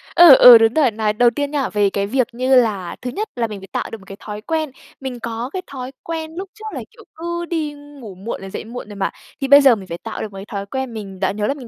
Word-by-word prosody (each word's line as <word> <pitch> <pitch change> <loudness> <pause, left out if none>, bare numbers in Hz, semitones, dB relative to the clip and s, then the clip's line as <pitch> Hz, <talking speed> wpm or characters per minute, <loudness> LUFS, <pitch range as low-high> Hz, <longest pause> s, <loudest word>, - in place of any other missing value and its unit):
Ừ, 340 -6 +10
ừ, 245 -2 +10
đúng 225 0 +3
rồi. 290 -6 +3
Nói 215 -1 -1
đầu 240 +3 +4
tiên 285 +3 -3
nha, 285 -3 -1
về 205 -1 +2
cái 200 0 -2
việc 255 +2 +1
như 255 +2 +2
là 210 -8 +1
thứ 250 - -4
nhất, 425 - -4
là 235 -2 -1
mình 210 -2 -7
phải 195 - -12
tạo - - -3
được 225 - -6
một 195 - -18
cái 195 - -9
thói 210 0 -7
quen. 315 +3 -2 0.3
Mình 260 -2 -5
có 230 +2 -4
cái 375 - -3
thói 260 -2 -7
quen 320 -1 -5
lúc 380 +2 -6
trước 435 - -12
là, - - -4
kiểu, - - -17
cứ 345 +1 -4
đi 315 -3 -3
ngủ 285 -8 -12
muộn 195 +4 -6
rồi 195 - -8
dậy - - -6
muộn 235 -1 -8
rồi 205 - -9
mà. 195 -1 -1 0.3
Thì 275 - 0
bây 285 +1 +8
giờ 270 -4 +6
mình 195 -3 -10
phải 170 - -5
tạo 225 - -6
được 215 - -5
một 195 - -10
cái 195 - -8
thói 200 -1 -5
quen 260 +3 -4
mình 195 -3 -8
đã 190 0 +1
nhớ 210 +1 -2
là - - +1
mình 270 -4 -11
240 Hz, 300 wpm, -20 LUFS, 210-285 Hz, 0.3 s, Ừ